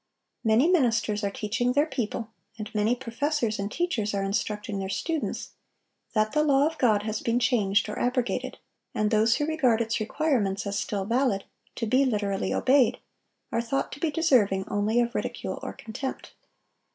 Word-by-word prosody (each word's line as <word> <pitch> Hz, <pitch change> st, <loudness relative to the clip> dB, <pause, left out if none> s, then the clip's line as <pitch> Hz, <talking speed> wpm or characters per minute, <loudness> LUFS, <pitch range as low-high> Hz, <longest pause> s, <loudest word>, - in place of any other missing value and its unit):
Many 225 Hz, +6 st, +4 dB
ministers 225 Hz, -, +2 dB
are 200 Hz, -, +1 dB
teaching 230 Hz, +5 st, -1 dB
their 290 Hz, +3 st, +3 dB
people, 230 Hz, -5 st, -4 dB, 0.3 s
and 215 Hz, +1 st, -7 dB
many 215 Hz, +3 st, +2 dB
professors 250 Hz, -1 st, -1 dB
and 200 Hz, +1 st, -3 dB
teachers 230 Hz, -13 st, -1 dB
are 195 Hz, -, 0 dB
instructing 205 Hz, 0 st, -2 dB
their 190 Hz, 0 st, -3 dB
students, 320 Hz, -, -3 dB, 0.6 s
that 215 Hz, -1 st, +2 dB
the 300 Hz, -, +2 dB
law 285 Hz, -2 st, +4 dB
of 320 Hz, 0 st, -2 dB
God 215 Hz, -5 st, +3 dB
has 215 Hz, 0 st, -3 dB
been 235 Hz, 0 st, +1 dB
changed 205 Hz, -5 st, +2 dB
or 210 Hz, -, -5 dB
abrogated; 250 Hz, 0 st, -1 dB, 0.4 s
and 215 Hz, 0 st, +1 dB
those 220 Hz, +1 st, +4 dB
who 295 Hz, -, 0 dB
regard 280 Hz, -8 st, +2 dB
its 225 Hz, -1 st, 0 dB
requirements 215 Hz, -5 st, 0 dB
as 200 Hz, +1 st, -1 dB
still 200 Hz, -2 st, -2 dB
valid, 235 Hz, -3 st, +1 dB, 0.3 s
to -, -, -2 dB
be 255 Hz, +5 st, +3 dB
literally 205 Hz, -6 st, 0 dB
obeyed, 260 Hz, -2 st, +3 dB, 0.5 s
are 230 Hz, -2 st, +1 dB
thought 240 Hz, +4 st, -2 dB
to 285 Hz, -, -8 dB
be 325 Hz, -, +1 dB
deserving 245 Hz, -, +2 dB
only 210 Hz, +3 st, +1 dB
of 240 Hz, 0 st, +1 dB
ridicule -, -, -3 dB
or -, -, -5 dB
contempt. 245 Hz, +4 st, -6 dB
230 Hz, 170 wpm, -27 LUFS, 210-265 Hz, 0.6 s, Many